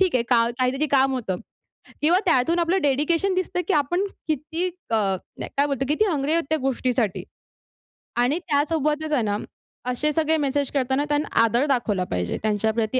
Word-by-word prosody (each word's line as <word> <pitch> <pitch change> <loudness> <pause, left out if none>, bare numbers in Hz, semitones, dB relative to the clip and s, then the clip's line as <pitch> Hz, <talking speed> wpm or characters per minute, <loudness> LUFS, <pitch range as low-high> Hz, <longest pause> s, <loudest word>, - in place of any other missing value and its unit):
ठीक 370 -7 +2
आहे 245 - +3
का 230 -1 +4
काहीतरी 260 +4 +1
काम 270 0 +3
होतं. 215 -7 -2 0.7
किंवा 335 +4 +5
त्यातून 330 0 +2
आपलं 345 +3 +2
डेडिकेशन 305 +7 +1
दिसतं, 370 -1 -1
की - - +2
आपण 350 +6 +1 0.2
किती 320 +4 -1 0.2
अ, 225 - +2
नाही, 195 -4 -2
काय 280 - +3
बोलतो 275 -2 -1
किती 305 +9 +2
हंग्री 305 -7 0
आहोत 335 +1 +2
त्या 315 - +2
गोष्टीसाठी 255 -5 -1 1.0
आणि 270 +6 +1
त्यासोबतच 305 -1 0
आहे 255 -6 +2
ना 205 -1 0 0.5
असे 290 +5 0
सगळे 320 +1 +2
मेसेज 285 -1 0
करताना 265 0 0
त्यांना 295 +1 +1 0.2
आदर 235 +4 +2
दाखवला 230 -8 +1
पाहिजे. 90 -1 -1
त्यांच्याप्रती 220 +3 0
280 Hz, 165 wpm, -24 LUFS, 245-315 Hz, 1.0 s, किंवा